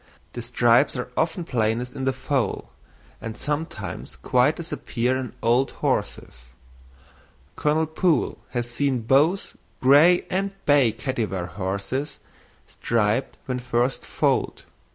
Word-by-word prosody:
The 120 Hz, -, -5 dB
stripes 120 Hz, +3 st, +3 dB
are 125 Hz, 0 st, -5 dB
often 165 Hz, +2 st, 0 dB
plainest 120 Hz, -2 st, -1 dB
in 135 Hz, -, -3 dB
the 135 Hz, -, +3 dB
foal; 130 Hz, 0 st, -2 dB, 0.5 s
and 115 Hz, -1 st, -6 dB
sometimes 150 Hz, +2 st, -4 dB
quite 125 Hz, +5 st, +2 dB
disappear 130 Hz, -7 st, -2 dB
in 130 Hz, -2 st, -4 dB
old 120 Hz, +4 st, +3 dB
horses. 60 Hz, -1 st, -3 dB, 1.1 s
Colonel 155 Hz, +2 st, +1 dB
Poole 160 Hz, -1 st, 0 dB
has 120 Hz, -1 st, -2 dB
seen 130 Hz, +1 st, 0 dB
both 145 Hz, -, +2 dB, 0.2 s
gray 150 Hz, +7 st, +6 dB
and 195 Hz, +1 st, -1 dB
bay 140 Hz, -5 st, +5 dB
Kattywar 110 Hz, -9 st, -3 dB
horses 100 Hz, -, -3 dB, 0.5 s
striped 115 Hz, +2 st, 0 dB
when 125 Hz, -2 st, -2 dB
first 125 Hz, +1 st, 0 dB
foaled. -, -, 0 dB
130 Hz, 115 wpm, -24 LUFS, 120-145 Hz, 1.1 s, gray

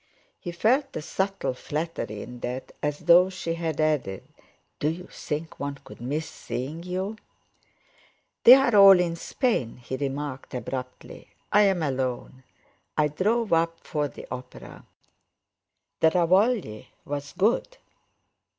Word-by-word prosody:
He 175 Hz, -, -6 dB
felt 235 Hz, +11 st, +1 dB
a -, -, -3 dB
subtle 190 Hz, -1 st, -2 dB
flattery 145 Hz, -7 st, -4 dB
in 125 Hz, 0 st, -10 dB
that, 125 Hz, +2 st, -5 dB
as 150 Hz, +1 st, -2 dB
though 175 Hz, +2 st, +6 dB
she 175 Hz, -3 st, -4 dB
had 165 Hz, -2 st, -3 dB
added: 150 Hz, -11 st, 0 dB, 0.6 s
"Do 150 Hz, -, 0 dB
you 175 Hz, +3 st, -5 dB
think 155 Hz, -1 st, -6 dB
one 140 Hz, 0 st, -3 dB
could -, -, -13 dB
miss 150 Hz, +6 st, -2 dB
seeing 145 Hz, +6 st, -6 dB
you?" 185 Hz, +4 st, -4 dB, 1.3 s
"They're 250 Hz, -2 st, +8 dB
all 195 Hz, -2 st, +9 dB
in 170 Hz, -2 st, 0 dB
Spain," 170 Hz, -, -1 dB
he 125 Hz, +2 st, -6 dB
remarked 140 Hz, -1 st, -4 dB
abruptly. 125 Hz, 0 st, -6 dB, 0.3 s
"I'm 195 Hz, -4 st, +4 dB
alone; 130 Hz, -2 st, -3 dB, 0.6 s
I 150 Hz, -1 st, +3 dB
drove 210 Hz, +7 st, 0 dB
up 165 Hz, 0 st, +1 dB
for 150 Hz, -3 st, -2 dB
the 135 Hz, -, -11 dB
opera. 125 Hz, 0 st, -9 dB, 1.1 s
The 160 Hz, -, +5 dB
Ravogli's 170 Hz, -, 0 dB
good. 230 Hz, -, +1 dB
160 Hz, 125 wpm, -26 LUFS, 135-190 Hz, 1.3 s, all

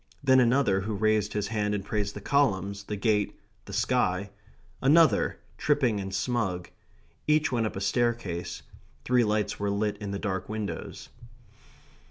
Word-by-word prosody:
Then 130 Hz, -1 st, +6 dB
another, 120 Hz, -5 st, +3 dB
who 105 Hz, +2 st, -3 dB
raised 105 Hz, 0 st, +1 dB
his 105 Hz, -1 st, -2 dB
hand 105 Hz, -2 st, 0 dB
and 100 Hz, -1 st, -4 dB
praised 105 Hz, -1 st, -2 dB
the 105 Hz, -, -6 dB
columns, 100 Hz, -7 st, +1 dB
the 105 Hz, -, -3 dB
gate, 105 Hz, 0 st, 0 dB, 0.3 s
the -, -, -10 dB
sky; 95 Hz, +2 st, +1 dB, 0.5 s
another, 155 Hz, +4 st, +4 dB, 0.2 s
tripping 130 Hz, -8 st, +2 dB
and 95 Hz, -1 st, -5 dB
smug. 95 Hz, -4 st, -2 dB, 0.6 s
Each 150 Hz, 0 st, +3 dB
went 115 Hz, -3 st, +1 dB
up -, -, -7 dB
a 95 Hz, -, -4 dB
staircase; 105 Hz, -5 st, -1 dB, 0.4 s
three 125 Hz, -1 st, +4 dB
lights 105 Hz, -1 st, 0 dB
were 100 Hz, 0 st, 0 dB
lit 105 Hz, +1 st, -1 dB
in 105 Hz, -1 st, -6 dB
the 100 Hz, -, -3 dB
dark 95 Hz, -2 st, -3 dB
windows. 110 Hz, -1 st, -5 dB
105 Hz, 155 wpm, -28 LUFS, 100-120 Hz, 0.6 s, Then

